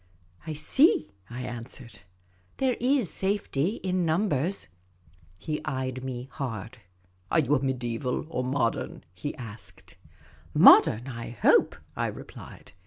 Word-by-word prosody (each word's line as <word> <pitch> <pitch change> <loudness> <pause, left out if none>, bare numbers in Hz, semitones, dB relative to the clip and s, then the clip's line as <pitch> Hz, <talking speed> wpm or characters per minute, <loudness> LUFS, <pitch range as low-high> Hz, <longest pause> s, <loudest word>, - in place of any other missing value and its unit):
" 90 - -26
I 155 - -3
see," 210 - +3 0.2
I 125 +1 -6
answered, 120 0 -8 0.3
" 90 0 -36
There 260 -2 +1
is 255 - +2
safety 195 -2 0
in 185 -1 0
numbers." 170 0 0 0.7
He 150 - -4
eyed 130 -3 -3
me 130 -1 -5
hard. 115 -4 -6 0.3
*' 90 0 -37
Are - - +3
you 145 -2 +3
mediaeval 125 -1 -2
or 140 -6 -3
modern? 125 -2 -1
" - - -37
he 145 - -3
asked. 115 - -11 0.3
" - - -27 0.2
Modern, 120 +5 +7
I 115 -3 -6
hope," 115 -4 +3 0.2
I - - 0
replied. - - -10
130 Hz, 140 wpm, -27 LUFS, 115-160 Hz, 0.7 s, Modern